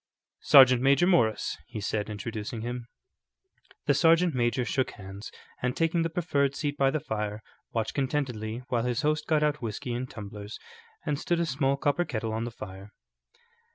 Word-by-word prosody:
"Sergeant 130 -3 +7
Major 140 +6 +4
Morris," 140 - +2
he 110 - -6
said, 105 +1 -2
introducing 110 +1 -5
him. 120 +1 -5 1.0
The - - +4
sergeant 165 0 +4
major 120 0 +1
shook 130 +1 0
hands, 95 +1 -9 0.3
and 125 0 -1
taking 165 +1 +2
the 165 - 0
proffered 145 -5 0
seat 145 0 -2
by 135 -1 +3
the 155 - 0
fire, 105 -3 -4 0.3
watched 115 -2 -2
contentedly 125 -5 -2
while 120 -2 +1
his 125 +4 -1
host 150 0 0
got 155 -2 +3
out 150 -1 +1
whiskey 115 +2 -4
and 125 +2 -3
tumblers 105 -1 -8 0.5
and 145 -1 -1
stood 175 +1 0
a 170 - +2
small 140 -2 +1
copper 145 +4 +1
kettle 110 -8 -3
on 110 +1 -2
the - - -3
fire. 95 -2 -9
125 Hz, 170 wpm, -28 LUFS, 110-150 Hz, 1.0 s, Sergeant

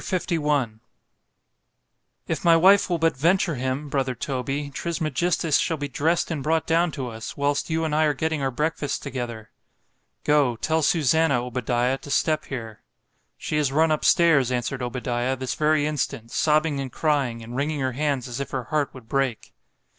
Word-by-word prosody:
LI 150 -10 0 1.5
IF - - -2
my 170 -1 +6
wife 195 +4 +5
will 175 - +1
but 165 0 +1
venture 170 +5 +2
him—brother 130 0 -2
Toby, 135 +3 -3
Trismegistus 165 +1 0
shall 165 - 0
be 145 -1 -3
dress'd 160 +6 0
and 155 -4 -2
brought 160 +3 +1
down 170 +2 +2
to 130 -4 -4
us, 110 -1 -8
whilst 140 +2 0
you 160 0 0
and 155 - -2
I 155 +1 +3
are 150 -2 +1
getting 160 +1 -1
our 135 - +1
breakfasts 150 +1 -2
together.—— 120 -5 -6 0.7
——Go, 145 -5 +3
tell 160 +7 0
Susannah, 155 -4 +2
Obadiah, 125 +1 -1
to - - -11
step 155 +1 +1
here. 115 -5 -7 0.6
She 150 - -3
is 145 -3 +1
run 160 +3 +3
up 155 - 0
stairs, 150 -7 +4
answered 125 +2 -2
Obadiah, 125 +1 -2
this 130 0 -3
very 155 -1 +2
instant, 125 -6 -3
sobbing 155 -1 +2
and 135 -2 -4
crying, 135 -7 0
and 120 +2 -8
wringing 145 +2 -1
her 130 -1 0
hands 140 -1 -1
as 120 +1 -5
if 140 -1 -4
her 130 -2 -3
heart 145 +3 -1
would 125 -3 -12
break. 135 -2 -2
140 Hz, 170 wpm, -24 LUFS, 125-155 Hz, 1.5 s, my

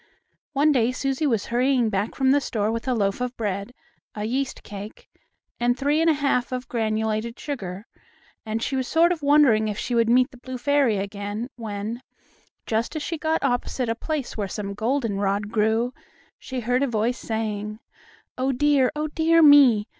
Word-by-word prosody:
One 295 +2 +4
day 250 -3 +2
Susie 275 +3 -1
was 225 -6 0
hurrying 245 -1 +1
back 200 +2 -2
from 265 -1 +3
the 285 +1 +4
store 215 -4 -1
with 230 +3 -4
a 255 - +1
loaf 200 +1 0
of 250 0 -3
bread, 200 0 -3 0.4
a 210 0 -3
yeast 265 +4 -2
cake 205 +1 -9 0.5
and 245 +1 +1
three 290 +4 +1
and 330 - +4
a - - +5
half 275 -4 0
of 255 0 -4
granulated 220 0 -2
sugar, 200 -9 -5 0.6
and 225 +1 -3
she 270 - -1
was 260 -1 -1
sort 335 +5 +4
of 340 -3 -2
wondering 280 -7 +4
if 210 -1 -3
she 245 - -3
would 230 -1 +3
meet 250 +2 +4
the 255 - -14
blue 255 +1 -7
fairy 275 -4 +2
again 205 +4 -4
when, 220 +1 -5 0.6
just 225 +6 -1
as 310 - -3
she 330 0 -4
got 320 +1 0
opposite 245 -1 -1
a - - +2
place 300 +1 -4
where 205 -3 -2
some 200 0 -5
goldenrod 205 -4 -1
grew, 225 +3 +1 0.5
she 260 -2 -5
heard 250 +3 +1
a 280 - +2
voice 235 +1 -1
saying: 215 -1 -3 0.6
"Oh, 265 +1 +1
dear! 270 -1 +3
Oh, 305 +1 -1
dear 325 +2 +3
me! 275 -8 +7
240 Hz, 185 wpm, -24 LUFS, 215-275 Hz, 0.6 s, me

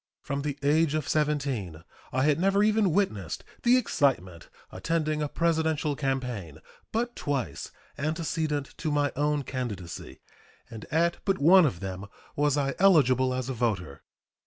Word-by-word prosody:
From 140 0 -3
the 145 -1 -3
age 155 +1 +3
of 155 -3 -2
17 135 - -1 0.3
I 130 +1 +1
had 150 +1 +3
never 195 +2 +3
even 215 -3 +3
witnessed 110 - -1 0.2
the 245 +1 +5
excitement 120 - 0 0.2
attending 155 - -1
a 150 - -1
Presidential 160 -2 0
campaign 125 - -3 0.3
but 240 +2 -1
twice 140 -4 -3 0.3
antecedent 155 -1 -2
to 160 - -2
my 145 -1 +1
own 150 0 0
candidacy, 105 - -6 0.5
and 110 -2 -8
at 170 +2 +1
but 195 -1 +1
one 175 +3 +6
of 90 -10 -4
them 95 0 -5 0.3
was 145 0 +2
I 140 -1 0
eligible 130 -9 +4
as 130 -1 -2
a 135 - -2
voter. 105 - -2
145 Hz, 145 wpm, -27 LUFS, 125-160 Hz, 0.5 s, one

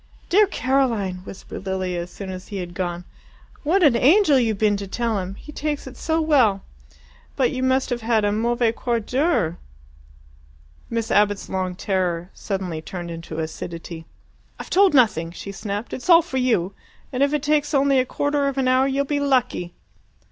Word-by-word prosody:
"Dear 410 +3 +5
Caroline!" 240 - 0
whispered 195 0 -9
Lilia 185 -2 -2
as 175 - -7
soon 190 +1 -7
as 185 0 -8
he 205 - -6
had 175 -2 -5
gone. 175 -1 -3 0.6
"What 355 +6 +2
an 280 -7 +5
angel 295 - +5
you've 225 -4 0
been 210 0 +2
to 200 0 -6
tell 230 +1 -1
him! 185 +1 -5
He 300 - -11
takes 300 -1 -3
it 265 -1 -9
so 320 +5 -1
well. 260 -11 +3 0.7
But 255 -3 +2
you 255 - -3
must 260 0 +1
have 240 -1 -1
had 225 -2 +1
a 205 - +2
MAUVAIS 235 +2 +1
QUART 235 -4 -1
D'HEURE." 255 - 0 1.3
Miss 230 -1 -2
Abbott's 205 -1 +2
long 185 -1 -2
terror 180 -2 -1
suddenly 185 -5 -4
turned 175 +1 -6
into 165 -1 -7
acidity. 165 +1 -6 0.5
"I've - - -9
told 385 -3 +5
nothing," 215 - +3
she 190 +3 -8
snapped. 205 +2 -5
"It's 260 - -6
all 340 -1 +8
for 290 -6 -4
you 225 -8 +1 0.4
and 255 - -1
if 280 - +4
it 295 -1 -1
only 305 0 +5
takes 295 +2 -9
a 275 -2 +3
quarter 285 +2 0
of 275 -1 -2
an 265 -1 +1
hour 255 +1 +4
you'll 275 +1 0
be 290 +1 -1
lucky!" 250 -11 0
230 Hz, 185 wpm, -22 LUFS, 190-275 Hz, 1.3 s, all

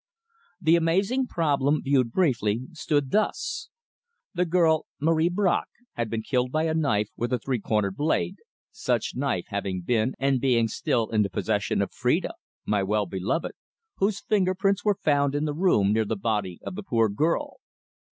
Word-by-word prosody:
The 165 -2 +4
amazing 195 +10 +1
problem, 145 - +1
viewed 130 -4 +2
briefly, 120 - +1
stood 145 -4 -1
thus: 385 - -1 0.6
The 180 -1 +1
girl, 160 -2 +2
Marie 160 +2 +2
Bracq, 185 0 +1 0.3
had 120 -2 -2
been 110 0 -3
killed 125 +1 0
by 155 +2 +1
a 160 -1 0
knife 110 -10 +1
with 120 +1 -3
a 125 - +2
three 125 +1 -2
cornered 105 -2 -1
blade, 145 - 0 0.3
such - - -1
knife 125 -9 -1
having 100 -3 -3
been 115 +6 0
and 135 -2 +1
being 120 -4 +3
still 115 +1 -1
in 110 -1 +3
the 100 - +1
possession 90 - 0
of - - -6
Phrida, - - 0 0.3
my 105 -1 +1
well 105 +2 0
beloved, 95 - -2 0.5
whose 200 +1 +1
finger 190 -4 +1
prints 195 +1 +1
were 205 -2 +2
found 145 -2 +2
in 145 +1 0
the 150 - -1
room 145 - +3
near 110 0 +2
the 110 - -2
body 100 -4 -2
of - - -5
the 205 - -5
poor 115 - +2
girl. 150 +12 -1
140 Hz, 170 wpm, -26 LUFS, 110-165 Hz, 0.6 s, The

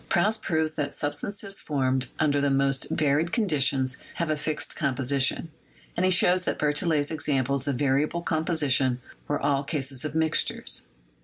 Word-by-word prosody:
Proust 215 +5 +1
proves 160 -2 0
that 145 -2 -3
substances 195 +7 -4
formed 130 -3 0
under 145 -2 +1
the 145 - +2
most 135 0 +1
varied 155 +3 +1
conditions 135 - +1 0.2
have 170 -2 -1
a - - +1
fixed 150 +1 -3
composition, 135 +4 0 0.4
and 175 - 0
he 185 - +4
shows 180 +1 +4
that - - -2
Berthollet's 150 0 0
examples 140 -3 -1
of 140 - 0
variable 145 +5 0
composition 145 -6 +2 0.3
were 145 - -1
all 140 -1 +1
cases 135 -3 -2
of 150 0 -5
mixtures. 160 -1 +1
145 Hz, 150 wpm, -26 LUFS, 135-160 Hz, 0.4 s, he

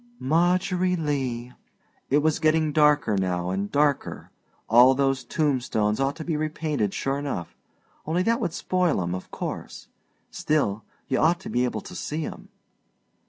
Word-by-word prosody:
"Margery 180 - +1
Lee." 130 -6 -2 0.6
It 145 +2 +3
was 155 -1 +2
getting 155 -1 +2
darker 150 -7 +3
now 90 -2 -1
and 100 +2 -2
darker 145 -1 0 0.4
all 125 +3 +6
those 135 -1 +1
tombstones 125 -8 0
ought 135 +1 0
to 160 - -6
be 160 -1 -2
repainted 150 -7 -1
sure 135 +1 -1
enough, 140 -12 -4 0.5
only 170 +3 +1
that 230 +4 +1
would 180 -8 -2
spoil 180 - 0
'em, 85 +1 -3
of 90 - -6
course. - - -6 0.4
Still, 110 -9 0 0.2
you 130 - 0
ought 170 +2 +3
to 215 +3 -7
be 125 - +2
able 110 -4 -3
to - - -11
see 155 +1 -3
'em. - - -9
145 Hz, 155 wpm, -25 LUFS, 120-160 Hz, 0.6 s, all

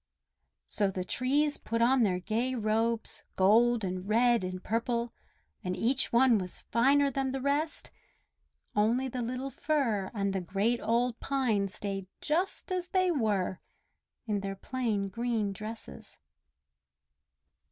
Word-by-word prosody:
So 205 -2 0
the 185 -1 -3
trees 285 +9 +1
put 230 - -2
on 250 +2 +4
their 190 -5 +2
gay 230 +7 -1
robes, 225 0 -1
gold 225 +4 +4
and 185 +1 -4
red 235 0 +4
and 185 0 -5
purple, 235 +1 -1 0.5
and 180 0 -2
each 255 +4 +1
one 235 -2 +5
was 180 -1 -6
finer 275 +4 +4
than 270 0 -1
the 270 - -2
rest; 285 +4 -1 0.8
only 230 +5 +2
the 250 0 -4
little 255 +3 -3
Fir 235 -13 0
and 200 -1 0
the 190 - -1
great 200 +7 0
old 235 +1 +1
Pine 245 -8 0
stayed 195 -1 -5
just 360 +5 -1
as 365 -1 -1
they 370 -1 +2
were, 210 - 0 0.7
in 210 -3 -1
their 195 0 -4
plain 215 -2 -2
green 225 -1 -1
dresses. 215 - -8
230 Hz, 135 wpm, -30 LUFS, 200-260 Hz, 0.8 s, one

